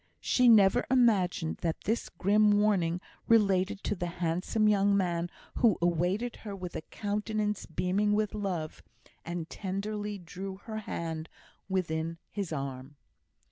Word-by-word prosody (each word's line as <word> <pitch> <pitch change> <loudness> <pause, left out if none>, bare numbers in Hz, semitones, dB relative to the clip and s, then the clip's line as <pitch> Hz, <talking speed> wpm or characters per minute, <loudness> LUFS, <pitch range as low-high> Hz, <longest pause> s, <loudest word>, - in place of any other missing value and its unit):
She 250 -1 +4
never 215 +1 +6
imagined 205 -10 +2
that 165 -2 -2
the 225 +3 -1
grim 210 +3 +4
warning 180 -5 +2 0.3
related 200 -2 +3
to - - 0
the 175 -3 -3
handsome 180 +5 0
young 200 -1 +4
man 175 -2 0 0.3
who 225 -6 +4
awaited 180 +7 0
her 205 -3 -7
with 180 -2 -7
a - - -3
countenance 210 +2 -2
beaming 185 +5 +1
with 210 -1 0
love, 180 -7 -3 0.4
and 170 -1 -4
tenderly 205 +2 -4
drew 190 +2 -7
her 220 -1 -5
hand 165 -5 -4 0.4
within 165 -3 -1
his 200 -5 -4
arm. 135 -1 -5
195 Hz, 135 wpm, -30 LUFS, 170-210 Hz, 0.4 s, never